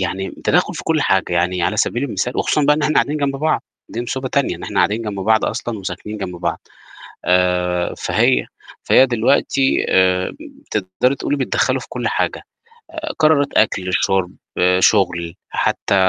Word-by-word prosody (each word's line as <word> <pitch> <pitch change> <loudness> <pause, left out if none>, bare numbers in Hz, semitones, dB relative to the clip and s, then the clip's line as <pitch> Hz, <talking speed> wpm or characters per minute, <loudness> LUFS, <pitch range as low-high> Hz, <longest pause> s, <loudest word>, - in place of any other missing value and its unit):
يعني 95 +1 -3
تدخُّل - - +2
في - - -6
كُلّ 160 -1 +1
حاجة، 95 -2 +1
يعني 90 +1 0
على 105 - 0
سبيل 120 +4 0
المثال 125 0 -3
وخصوصًا 150 - +1
بقى 150 +1 +4
إحنا 155 +1 +1
قاعدين 150 - +2
جنب 140 -2 -1
بعض، 155 +3 0 0.3
دي 120 - -4
مصيبة 130 +2 -3
تانية 140 0 0
إن - - -12
إحنا - - -6
قاعدين 110 +3 +2
جنب 105 -3 -4
بعض 110 +2 +2
أصلًا 115 -3 -3
وساكنين 95 +3 -6
جنب 90 -3 -5
بعض، - - -3 0.7
آآ، 90 -1 +1
فهي - - +2 0.4
فهي 130 - +5
دلوقتي 135 +2 +1
آمم، 95 - +2 0.3
تقدري 105 +7 0
تقولي 145 - -2
بيتدخّلوا 130 - 0
في - - -9
كُلّ - - -3
حاجة - - -1 0.5
آآ، 315 -2 -5
قرارت 155 -2 +3
أكل، 95 -4 +1
شُرب، 95 -1 +1 0.5
شُغل 90 -4 +2 0.2
حتى - - 0
105 Hz, 165 wpm, -19 LUFS, 90-135 Hz, 0.7 s, فهي